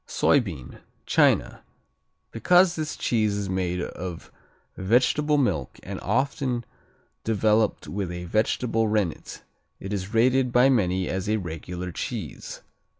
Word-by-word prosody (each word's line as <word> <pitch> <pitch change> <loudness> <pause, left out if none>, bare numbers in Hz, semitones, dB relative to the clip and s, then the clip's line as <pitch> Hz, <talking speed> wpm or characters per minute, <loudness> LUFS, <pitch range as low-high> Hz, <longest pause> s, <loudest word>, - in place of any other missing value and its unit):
Soybean 90 - 0 0.3
China - - +2 0.7
Because 175 +9 +4
this 155 -1 -4
cheese 110 -3 +1
is 100 -2 -3
made 90 -1 -1
of 90 -1 -7 0.4
vegetable 125 +9 +2
milk 80 - -1
and - - -6
often 130 -2 -1 0.6
developed 110 0 +1
with 95 -2 -3
a 90 0 -6
vegetable 110 +3 0
rennet, 105 -6 -2 0.4
it 100 +2 -5
is 100 0 -4
rated 125 +2 +3
by 125 +2 +5
many 95 -7 +1
as 95 +2 -3
a 110 - +2
regular 90 0 -6
cheese. - - -6
105 Hz, 120 wpm, -25 LUFS, 90-125 Hz, 0.7 s, by